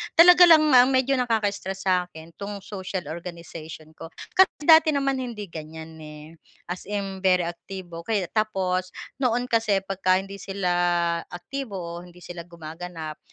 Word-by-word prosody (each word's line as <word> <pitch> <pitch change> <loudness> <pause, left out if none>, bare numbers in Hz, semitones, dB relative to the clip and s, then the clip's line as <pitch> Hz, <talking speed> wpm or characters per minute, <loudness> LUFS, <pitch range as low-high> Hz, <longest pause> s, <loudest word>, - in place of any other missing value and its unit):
Talaga 355 +1 +8
lang 320 -2 +7
nga 250 -1 +7
medyo 260 0 +2
nakaka-stress 205 -5 -1
sa'kin 180 -3 -2
'tong 200 -1 -6
social 190 -4 -6
organization 165 -2 -9
ko 160 - -10 0.3
kasi 380 - +9 0.2
dati 320 -1 +6
naman 275 -1 0
hindi 220 -7 -6
ganiyan 160 0 -9
eh. 150 -1 -11 0.5
As 180 - -7
in 195 -2 -4
very 185 -1 +3
aktibo 175 0 -7
kay 200 +3 -1
tapos 185 -4 -1 0.2
noon 250 -1 0
kasi 215 -4 +2
pagka 190 -1 +1
hindi 195 +1 -4
sila 195 -1 -2 0.6
aktibo 225 +5 -7
o 175 -1 -7
hindi 180 0 -16
sila 175 -1 -9
gumaganap, 165 -1 -8
190 Hz, 145 wpm, -24 LUFS, 170-225 Hz, 0.6 s, kasi